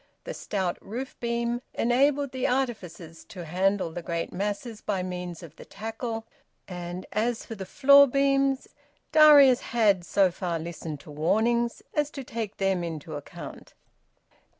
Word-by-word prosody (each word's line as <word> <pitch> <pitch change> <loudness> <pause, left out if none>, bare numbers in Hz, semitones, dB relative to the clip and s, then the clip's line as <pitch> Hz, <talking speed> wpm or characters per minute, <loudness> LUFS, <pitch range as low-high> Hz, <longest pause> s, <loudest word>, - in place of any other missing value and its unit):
The - - -6
stout 190 -4 -2
roof 250 +6 -6
beam 235 0 -1
enabled 275 +3 +2
the 260 0 -1
artificers 185 -11 -3
to 180 -5 -9
handle 185 +2 0
the 175 - -5
great 170 0 -3
masses 205 +4 -3
by 195 -3 -2
means 180 -2 -6
of 165 -1 -12
the - - -10
tackle; 225 +1 -5 0.4
and 175 0 -6
as 225 +2 -1
for - - -7
the 190 -4 -7
floor 280 +1 +7
beams, 275 0 +1 0.4
Darius 295 -5 +8
had 210 -6 +2
so 190 +1 +3
far 175 -2 -3
listened 160 -2 -6
to 150 - -12
warnings 230 +10 +1
as 295 -1 +1
to 275 - -4
take 225 -4 -5
them 195 -2 +1
into 160 -2 -6
account. 145 -1 -9
210 Hz, 150 wpm, -27 LUFS, 175-245 Hz, 0.4 s, Darius